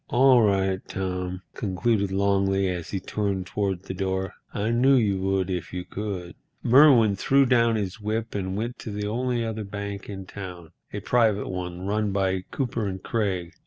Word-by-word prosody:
"All 130 0 +6
right, 95 -2 +2
Tom," 90 -1 -3
concluded 100 0 0
Longley, 95 0 +2
as 90 -2 -4
he 95 - -2
turned 100 -1 -2
toward 95 -2 -2
the 95 - -5
door; 95 0 -2 0.2
"I 105 +3 -1
knew 130 +4 +4
you 105 -6 +2
would 95 -1 0
if 90 -2 -3
you 90 -1 -4
could." 95 -4 -5 0.3
Merwin 125 -5 +6
threw 135 +7 +3
down 115 -2 +3
his 100 -1 -3
whip 110 +2 -2
and 95 -1 -2
went 120 +3 -4
to - - -7
the 105 0 -3
only 120 +2 -1
other 110 -1 -3
bank 100 0 -6
in 95 -2 -6
town, 90 -4 -9 0.2
a - - -5
private 110 -4 +2
one, 90 0 -5
run 105 +1 0
by 95 -1 0
Cooper 115 -6 -2
& - - -29
Craig. 95 -7 -1
100 Hz, 175 wpm, -25 LUFS, 95-110 Hz, 0.3 s, All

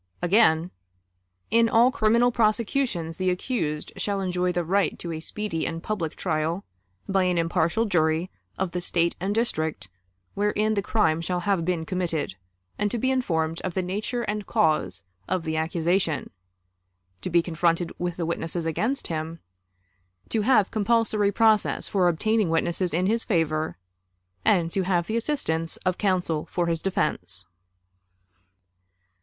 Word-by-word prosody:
Again: 175 -3 +3 0.8
"In 230 0 +4
all 235 +3 +5
criminal 235 +2 +3
prosecutions 215 -6 0
the 185 -1 +1
accused 180 - -2
shall 200 -1 -1
enjoy 180 -1 0
the 175 0 -1
right 190 +1 +1
to 170 - -5
a 160 - -4
speedy 190 0 -3
and 165 0 -5
public 175 -8 -3
trial, 165 +2 -1 0.4
by 195 -1 +2
an 180 -1 +1
impartial 170 +6 +1
jury 165 -2 +1 0.3
of 190 -2 -1
the 180 - -3
State 170 -1 +1
and 195 +4 -1
district 160 - -1 0.4
wherein 210 +1 +1
the 200 - +1
crime 190 -6 +1
shall 175 +1 -2
have 195 -2 +1
been 170 -2 -1
committed, 170 - -2 0.5
and 205 0 +1
to 240 - -2
be 260 +3 +1
informed 165 -11 0
of 185 - -4
the 190 - 0
nature 215 +6 -2
and 210 -1 -3
cause 95 - +1 0.2
of 185 -1 -1
the 160 -1 -2
accusation; 165 +1 0 0.9
to - - -3
be 170 -1 +3
confronted 170 0 0
with 175 -1 -2
the 170 - -1
witnesses 165 0 -2
against 225 - -1
him; 160 0 -4 0.9
to 220 - +1
have 215 -3 +3
compulsory 215 -1 +2
process 220 0 +2
for 185 -3 +2
obtaining 210 +4 +1
witnesses 170 +2 0
in 175 +3 +1
his 225 +4 +2
favor, 160 -4 0 0.7
and 170 -4 +3
to 195 - 0
have 180 -2 +1
the 220 - -3
assistance 165 - -1
of 185 -1 0
counsel 180 -6 0
for 175 - 0
his 165 -1 -1
defense." 100 - -2
180 Hz, 150 wpm, -25 LUFS, 165-210 Hz, 0.9 s, all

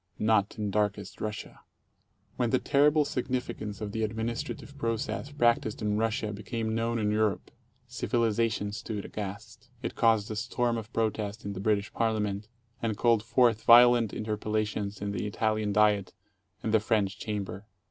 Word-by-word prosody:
Not 105 -2 +2
in 105 -2 -2
Darkest 105 0 -1
Russia. 105 -1 -5 0.8
When 120 -2 0
the 130 - +3
terrible 145 +3 +3
significance 125 -6 -3
of 105 -1 -3
the 110 - -3
administrative 115 +5 -3
process 115 +1 -2
prac 120 -5 +3
ticed 110 - -5
in 105 -1 0
Russia 110 -1 -1
became 110 +2 -3
known 115 +1 0
in 105 -2 +1
Europe, 105 -1 0 0.4
civilization 115 -3 0
stood 105 -1 -5
aghast. 105 +4 -7
It - - -3
caused 110 -2 +2
a - - -3
storm 120 +2 0
of 115 0 -6
protest 110 -2 -2
in 100 - -3
the 95 - -6
British 100 0 0
Parliament, 105 -2 -1 0.3
and 110 -3 -1
called 115 -2 +3
forth 115 -1 +3
violent 120 -2 +7
interpellations 105 -1 -2
in 100 - -2
the 105 +1 -2
Italian 110 0 0
Diet 105 -2 +3 0.5
and 110 - -1
the 110 - +6
French 105 -1 0
Chamber. 100 -1 -4
110 Hz, 155 wpm, -29 LUFS, 105-115 Hz, 0.8 s, violent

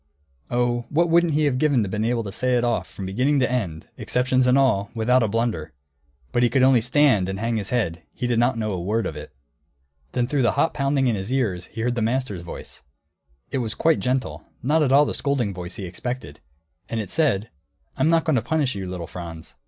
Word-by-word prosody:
Oh, 120 -1 0
what 170 +3 +2
wouldn't 170 -2 +3
he 155 - +2
have 130 -3 +1
given 145 -6 +3
to - - -3
be 105 +4 -1
able 120 -1 0
to 100 - -6
say 125 +4 +1
it 120 - 0
off 120 -1 0
from 95 - -7
beginning 130 +10 +1
to 125 -2 +1
end, 90 -11 -3
exceptions 130 0 +1
and 125 +2 +5
all, 110 -8 +2
without 125 +3 +3
a 110 - +2
blunder! 105 -8 -2 0.6
But 120 - +1
he 120 - +4
could 130 0 +2
only 130 -3 +5
stand 125 -6 +3
and 95 - -3
hang 115 +1 -1
his 100 -3 -3
head; 90 -10 -1
he 125 - -4
did 120 -2 +1
not 120 0 +2
know 110 -1 -1
a 90 -3 -3
word 110 +5 0
of 80 - -4
it. 75 - -9 0.8
Then 120 - +1
through 140 +2 0
the 120 - +3
hot 150 +4 +1
pounding 140 -1 +1
in 120 - +2
his 95 +4 -4
ears 100 -9 -1
he 115 - -7
heard 120 +1 0
the 120 - -2
master's 115 -5 -1
voice; 85 -5 -9 0.7
it 135 - -1
was 115 -3 -2
quite 165 -1 +2
gentle; 130 +1 -2 0.2
not 155 +5 +2
at 140 -3 +2
all 145 +2 +6
the - - -2
scolding 130 -8 -1
voice 90 0 -6
he 100 - -5
expected. 90 - -6 0.5
And 115 - -2
it 105 -4 -5
said, 125 -10 +1 0.4
"I'm - - +1
not 165 0 +3
going 155 -5 +2
to - - +1
punish 155 -3 0
you, 95 -2 -5
little 90 -2 -5
Franz. 85 -2 -9
120 Hz, 230 wpm, -23 LUFS, 100-135 Hz, 0.8 s, all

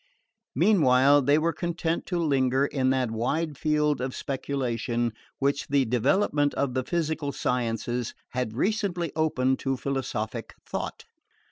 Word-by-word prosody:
Meanwhile 145 -7 +5
they 145 +3 +4
were 165 +2 +1
content 170 -1 -2
to 180 - -1
linger 135 -4 +2
in 130 -2 0
that 130 -3 +1
wide 145 +8 -1
field 150 -1 +1
of 130 0 -3
speculation 120 -4 -2 0.2
which 140 +1 0
the 140 -1 +2
development 145 - +2
of 135 -2 0
the 130 0 0
physical 160 -2 -1
sciences 120 -1 -2
had 125 -3 -3
recently 190 -3 0
opened 130 -5 +1
to 135 -1 -1
philosophic 130 -6 -3
thought. - - -5
140 Hz, 130 wpm, -27 LUFS, 125-155 Hz, 0.2 s, Meanwhile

